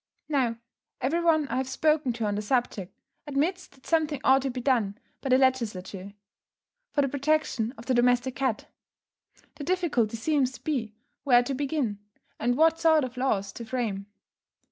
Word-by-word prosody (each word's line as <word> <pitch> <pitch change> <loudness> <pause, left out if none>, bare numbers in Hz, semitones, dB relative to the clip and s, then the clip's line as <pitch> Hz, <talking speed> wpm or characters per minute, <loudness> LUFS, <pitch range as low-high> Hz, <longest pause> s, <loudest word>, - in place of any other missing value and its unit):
Now, 255 -6 +1 0.4
every 315 +7 0
one 315 -3 +3
I - - -1
have 260 0 -1
spoken 305 -1 +2
to 230 -1 -3
on 205 - 0
the 205 - -2
subject, 215 -5 -1 0.4
admits 325 +7 -1
that 270 -1 -24
something 310 -4 +1
ought 270 +1 +5
to 270 - -2
be 255 0 -4
done, 235 -6 +1 0.2
by 270 - -3
the 255 - +6
Legislature, 205 -7 -1 0.8
for 285 - +2
the - - +1
protection 275 -4 0
of 230 - -11
the 260 - +1
domestic 245 +1 +2
cat. 260 -6 -1 0.9
The 290 - -6
difficulty 285 - 0
seems 265 +1 +1
to - - -13
be 230 -8 -2 0.3
where 245 -3 +5
to 275 - -3
begin, 270 -6 -1 0.4
and 245 +2 +1
what 325 +1 +4
sort 315 -2 +4
of 255 -1 -5
laws 215 -6 0
to 235 - -7
frame. 220 -5 -3
260 Hz, 170 wpm, -27 LUFS, 230-290 Hz, 0.9 s, the